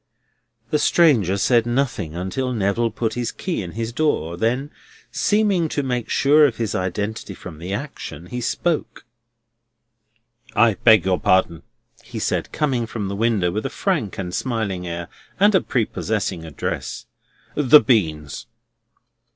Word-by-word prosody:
The 150 Hz, -, +2 dB
stranger 130 Hz, -, +4 dB
said 120 Hz, +3 st, +3 dB
nothing 120 Hz, -, -1 dB
until 95 Hz, +9 st, -2 dB
Neville 110 Hz, +2 st, +1 dB
put 115 Hz, -1 st, -2 dB
his 120 Hz, -1 st, -2 dB
key 180 Hz, -, -3 dB
in 90 Hz, -3 st, -7 dB
his 115 Hz, +1 st, -4 dB
door; 120 Hz, -, 0 dB
then, 125 Hz, -, -1 dB, 0.4 s
seeming 205 Hz, -6 st, +2 dB
to 145 Hz, -, -1 dB
make 125 Hz, -3 st, -2 dB
sure 150 Hz, +2 st, +5 dB
of 120 Hz, -, -5 dB
his 115 Hz, -3 st, -2 dB
identity 100 Hz, +2 st, -3 dB
from 80 Hz, -4 st, -10 dB
the 90 Hz, +3 st, -6 dB
action, 100 Hz, -, -6 dB
he 125 Hz, +7 st, -5 dB
spoke: 160 Hz, +7 st, -2 dB, 1.5 s
"I 115 Hz, -2 st, +5 dB
beg 110 Hz, -2 st, +5 dB
your 95 Hz, -1 st, +1 dB
pardon," 95 Hz, -3 st, +2 dB, 0.4 s
he -, -, -9 dB
said, -, -, -1 dB
coming 130 Hz, -6 st, 0 dB
from 105 Hz, -3 st, -4 dB
the 100 Hz, -, -3 dB
window 105 Hz, -5 st, +1 dB
with 105 Hz, +4 st, -3 dB
a -, -, -6 dB
frank 150 Hz, -, -1 dB
and 90 Hz, -2 st, -4 dB
smiling 105 Hz, -8 st, -2 dB
air, 85 Hz, 0 st, -5 dB, 0.3 s
and 205 Hz, +2 st, +5 dB
a 190 Hz, -, +4 dB
prepossessing 105 Hz, -7 st, -2 dB
address; 80 Hz, -4 st, -4 dB, 0.5 s
"the 150 Hz, 0 st, +7 dB
beans." 80 Hz, -, 0 dB
115 Hz, 145 wpm, -22 LUFS, 95-135 Hz, 1.5 s, the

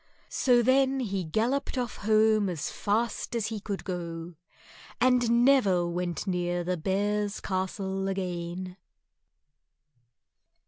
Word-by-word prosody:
So 245 Hz, -2 st, +3 dB
then 265 Hz, +2 st, +3 dB
he 195 Hz, -5 st, -2 dB
galloped 240 Hz, -, -1 dB
off 245 Hz, -1 st, -2 dB
home 215 Hz, -1 st, +3 dB
as 160 Hz, -5 st, -3 dB
fast 225 Hz, +3 st, -1 dB
as 220 Hz, -2 st, -1 dB
he 220 Hz, -2 st, -4 dB
could 200 Hz, -1 st, -5 dB
go, 170 Hz, -2 st, -5 dB, 0.7 s
and 245 Hz, -1 st, +4 dB
never 195 Hz, -11 st, +4 dB
went 175 Hz, +1 st, -3 dB
near 175 Hz, -2 st, -1 dB
the 180 Hz, +1 st, -1 dB
Bears' 205 Hz, +4 st, -1 dB
Castle 190 Hz, 0 st, -2 dB
again. 180 Hz, -1 st, -4 dB
195 Hz, 110 wpm, -28 LUFS, 180-230 Hz, 0.7 s, and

